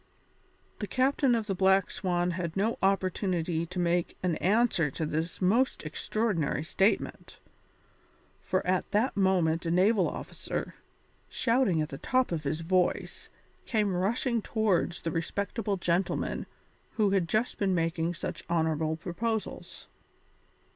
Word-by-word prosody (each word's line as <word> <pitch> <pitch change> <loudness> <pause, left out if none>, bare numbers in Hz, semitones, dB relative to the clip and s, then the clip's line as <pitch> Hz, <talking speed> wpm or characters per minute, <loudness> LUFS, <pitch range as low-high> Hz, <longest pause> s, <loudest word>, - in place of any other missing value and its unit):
The 210 - -3
captain 260 +2 +2
of 225 -2 -1
the 200 - -1
Black 190 +1 +3
Swan 180 -1 0
had 170 0 -4
no 220 +4 0
opportunity 185 -3 0
to 180 +2 -8
make 175 -1 0
an 175 -3 +1
answer 200 -6 +2
to 155 +4 -3
this 160 +2 -3
most 220 +3 +2
extraordinary 170 -1 -1
statement, 195 +6 0 1.0
for 185 - -1
at 185 0 0
that 220 +4 +2
moment 180 -4 +2
a - - +1
naval 185 +3 +3
officer, - - -5 0.6
shouting 230 -10 +2
at 155 - -5
the 135 - -7
top 255 -3 +1
of 155 -3 -3
his 155 +3 -1
voice, 180 +2 0 0.4
came 210 -5 +1
rushing 230 +5 0
towards 200 -6 0
the 165 - -1
respectable 200 +5 -2
gentleman 175 +1 -1 0.5
who 210 -3 +2
had 185 -4 +1
just 215 +7 0
been 195 -2 +2
making 165 0 0
such - - -5
honourable 160 -1 +1
proposals. 215 +6 -4
185 Hz, 135 wpm, -29 LUFS, 165-215 Hz, 1.0 s, Black